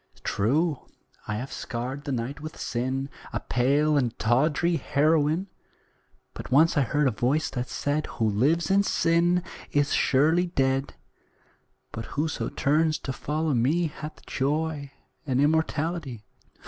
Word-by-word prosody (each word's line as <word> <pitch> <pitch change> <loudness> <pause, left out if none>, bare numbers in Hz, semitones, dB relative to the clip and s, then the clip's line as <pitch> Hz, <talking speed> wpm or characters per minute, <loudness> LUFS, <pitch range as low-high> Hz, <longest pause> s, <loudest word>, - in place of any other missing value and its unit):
True, 145 - 0 0.4
I 105 - -2
have 125 +5 -5
scarred 130 +4 -5
the 140 - -3
night 130 +4 -3
with 155 +1 -8
sin, 130 +3 -2 0.3
A - - -1
pale 145 +4 +2
and 125 -5 0
tawdry 150 +8 +2
heroine; 155 +4 +2 0.9
But - - -8
once 155 +5 +5
I 145 - +4
heard 145 +2 +1
a - - +2
voice 130 +8 0
that 125 -1 -4
said 145 +1 -1
'Who 110 - -1
lives 150 - +2
in 200 +1 +5
sin 175 -1 +2 0.3
is 145 0 +2
surely 160 +6 +3
dead, 135 -4 0 1.0
But 115 - -6
whoso 155 +2 -2
turns 155 +2 +1
to 135 - -5
follow 155 +2 -1
me 140 +9 +2
Hath 150 +1 -9
joy 145 0 -2 0.4
and 130 -1 +1
immortality.'" 155 - 0
145 Hz, 135 wpm, -26 LUFS, 130-160 Hz, 1.0 s, once